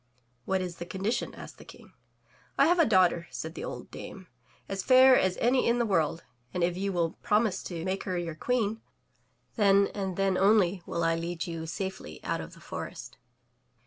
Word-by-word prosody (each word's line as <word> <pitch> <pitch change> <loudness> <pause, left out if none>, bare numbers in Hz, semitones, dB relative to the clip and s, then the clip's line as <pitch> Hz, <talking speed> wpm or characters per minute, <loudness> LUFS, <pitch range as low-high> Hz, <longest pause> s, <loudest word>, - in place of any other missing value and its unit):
"What 190 0 0
is 180 -2 -5
the 175 - -6
condition? 205 +5 -2
asked - - -11
the - - -11
King. - - -15 0.6
"I 275 - +6
have 350 +3 +3
a 330 - +5
daughter, 180 -4 +3
said 160 0 -6
the - - -7
old - - -7
dame, 190 -1 -9 0.4
"as 195 0 -3
fair 260 +3 +7
as 185 -5 +2
any 250 +2 +2
in 235 +1 +3
the 240 - +1
world, 165 -5 0 0.3
and 180 - 0
if 175 0 +1
you 195 +2 -2
will 170 -3 0
promise 210 -3 +1
to 170 -2 -5
make 190 +1 -2
her 185 -2 -2
your 170 -2 -3
Queen, 225 +4 -1 0.8
then 200 -2 +4
and 190 -3 -3
then 195 -1 +1
only 195 -2 +3
will 170 - -2
I 165 0 +3
lead 170 0 -3
you 165 -2 -5
safely 190 - -5
out - - -2
of - - -10
the - - -16
forest. - - -8
190 Hz, 195 wpm, -29 LUFS, 170-210 Hz, 0.8 s, fair